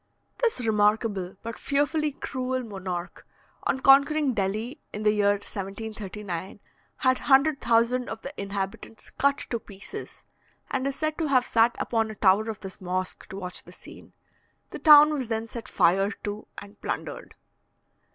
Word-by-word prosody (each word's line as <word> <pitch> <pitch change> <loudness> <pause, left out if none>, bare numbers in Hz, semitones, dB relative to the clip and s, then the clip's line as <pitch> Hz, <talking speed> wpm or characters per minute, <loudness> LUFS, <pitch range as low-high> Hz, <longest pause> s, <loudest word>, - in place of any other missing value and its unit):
This 455 - 0
remarkable, 210 -3 +1
but 230 0 -6
fearfully 295 +2 +1
cruel 255 -2 -3
monarch, 190 -4 -6 0.4
on 265 - 0
conquering 280 +1 +5
Delhi 215 +6 -2
in 210 - -5
the 210 - +5
year 205 -1 +3
1739, 200 -2 -6 0.4
had 255 -1 +2
100,000 255 -4 +3
of 225 0 -7
the 275 - -6
inhabitants 200 +2 -5
cut 280 0 +2
to 235 - 0
pieces, 205 - -10 0.5
and 265 0 0
is 275 - -2
said 310 0 -2
to 320 - 0
have 255 -3 +3
sat 230 +1 +3
upon 225 -2 0
a 220 - -7
tower 205 +2 +3
of 215 -2 -6
this 195 0 -9
mosque 185 0 -3
to 195 - -7
watch 180 -2 -6
the - - -14
scene. - - -13 0.6
The - - -6
town 300 -1 +8
was 265 -5 -2
then 225 0 -2
set 230 -1 -8
fire 195 +4 +3
to 210 0 -6
and 205 +1 -11
plundered. - - -5
225 Hz, 150 wpm, -26 LUFS, 200-265 Hz, 0.6 s, town